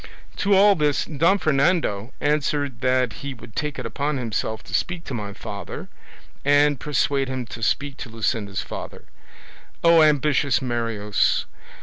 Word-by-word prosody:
To 200 0 +3
all 200 +1 +7
this 150 -5 +1
Don 165 +6 +2
Fernando 140 - +1
answered 145 -4 0
that 130 -2 +2
he 140 -1 -5
would 115 -2 -14
take 150 -2 -2
it - - -5
upon 140 +6 -2
himself 110 -2 -3
to - - -11
speak 175 -1 -1
to - - -7
my 105 -4 -4
father, - - -7 0.5
and 145 -1 +4
persuade 140 -2 0
him 130 -1 -3
to 115 +1 -9
speak 140 +4 0
to 125 - -7
Luscinda's 110 -3 -2
father. - - -8 0.8
O, 170 -1 +7
ambitious 150 -2 +3
Marius! 115 -5 0
140 Hz, 145 wpm, -23 LUFS, 115-150 Hz, 0.8 s, all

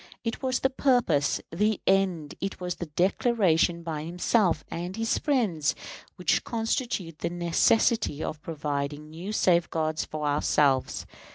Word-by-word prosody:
It 230 -1 -3
was 260 -1 0
the 265 - +2
purpose, 245 - +2
the 210 +5 +1
end, 185 -6 +1
it 195 - -3
was 180 -1 -4
the 175 - -5
declaration 175 -1 +2
by 155 -3 -4
himself 175 0 +1
and 175 +2 -4
his 225 0 0
friends, 210 - +1 0.4
which 180 -2 +1
constitute 225 - -2
the 170 - -1
necessity 175 +1 +2
of 155 -1 -5
providing 150 -1 -4
new 175 +6 -6
safeguards 165 -5 +1
for 155 -1 -5
ourselves. 145 -2 +1
175 Hz, 130 wpm, -27 LUFS, 155-215 Hz, 0.4 s, the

